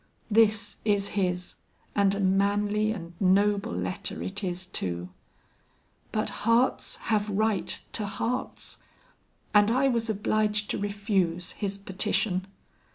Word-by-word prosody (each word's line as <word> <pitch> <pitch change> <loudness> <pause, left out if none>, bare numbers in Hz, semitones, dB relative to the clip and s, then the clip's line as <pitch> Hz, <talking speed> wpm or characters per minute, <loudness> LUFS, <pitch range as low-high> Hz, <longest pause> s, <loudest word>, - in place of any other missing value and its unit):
This 215 0 +3
is 200 -2 +2
his, 180 -2 -1 0.4
and 200 -1 +3
a - - -3
manly 205 +2 +2
and 175 -5 -6
noble 200 +3 +3
letter 200 -1 -3
it 200 +2 -3
is 180 0 -2
too; 90 - -3 1.0
but - - 0
hearts 230 +3 +2 0.2
have 210 -1 +2
right 210 0 0
to 210 -2 -1
hearts, 225 +5 -3 0.7
and 205 0 +6
I 260 +4 +3
was 230 -2 0
obliged 210 0 +1
to - - -2
refuse 200 -4 0
his 200 -2 -3
petition." 190 -1 0
205 Hz, 120 wpm, -27 LUFS, 190-215 Hz, 1.0 s, and